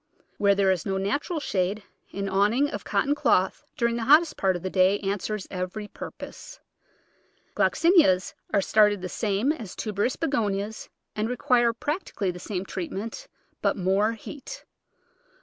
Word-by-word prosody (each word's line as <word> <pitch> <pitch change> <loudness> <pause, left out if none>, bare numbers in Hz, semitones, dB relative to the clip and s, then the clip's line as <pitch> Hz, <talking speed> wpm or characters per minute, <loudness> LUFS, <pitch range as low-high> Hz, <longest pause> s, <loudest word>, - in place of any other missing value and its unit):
Where 200 -1 +4
there 195 -1 +3
is 180 -3 -1
no 195 -2 -1
natural 285 - -1
shade 195 -4 -1 0.3
an 200 0 -3
awning 210 +9 +2
of 205 - -5
cotton 205 +8 +1
cloth 190 -9 +1
during 235 -1 +1
the 230 - -2
hottest 305 +5 +5
part 190 -1 +1
of 175 - -6
the 185 - -2
day 190 +1 +4
answers 200 +1 -2
every 185 +3 -4
purpose. - - -9 1.0
Glox - - +1
inias 295 - +5 0.2
are 200 - +3
started 210 -2 +3
the 185 - -3
same 215 +7 0
as 230 - -6
tuberous 215 +3 -1
Begonias 215 -8 -2 0.3
and 215 +2 -1
require 245 -1 +3
practically 235 - -3
the 180 - -9
same 190 0 -4
treatment, 200 - -5 0.3
but - - +1
more 195 +4 +2
heat. 290 - -9
205 Hz, 150 wpm, -26 LUFS, 195-240 Hz, 1.0 s, hottest